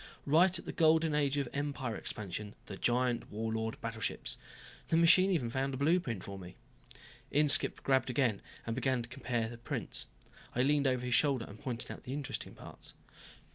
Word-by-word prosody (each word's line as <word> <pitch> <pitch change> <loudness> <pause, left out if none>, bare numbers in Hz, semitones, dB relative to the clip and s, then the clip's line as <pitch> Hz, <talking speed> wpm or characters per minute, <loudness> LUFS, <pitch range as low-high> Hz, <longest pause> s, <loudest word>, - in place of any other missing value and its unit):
Right 170 +5 +5
at - - -6
the - - -4
Golden 160 -1 +4
Age 145 -1 +1
of 140 -3 0
Empire 140 -5 -2
expansion, 105 +1 -5
the 100 - -6
giant 120 +3 +1
Warlord 110 +1 -3
battleships. 115 -1 -3 0.5
The 165 - +2
machine 185 +3 +7
even 140 -11 0
found 135 +1 -1
a - - -4
blueprint 140 - +1
for 100 0 -7
me." 90 -1 -10 0.7
Inskipp 145 0 +3
grabbed 135 -1 +2
again 125 -5 +1 0.2
and 115 - -2
began 130 0 0
comparing 120 -2 -2
the 120 - -8
two - - -24
prints. - - -2 0.5
I 125 - +3
leaned 145 0 +3
over 125 -1 0
his 125 - -1
shoulder 135 -4 +3
and 100 - -11
pointed 120 -2 -4
out - - -8
the 130 - -6
interesting 145 -2 -4
parts. - - -9
130 Hz, 175 wpm, -33 LUFS, 115-145 Hz, 0.7 s, machine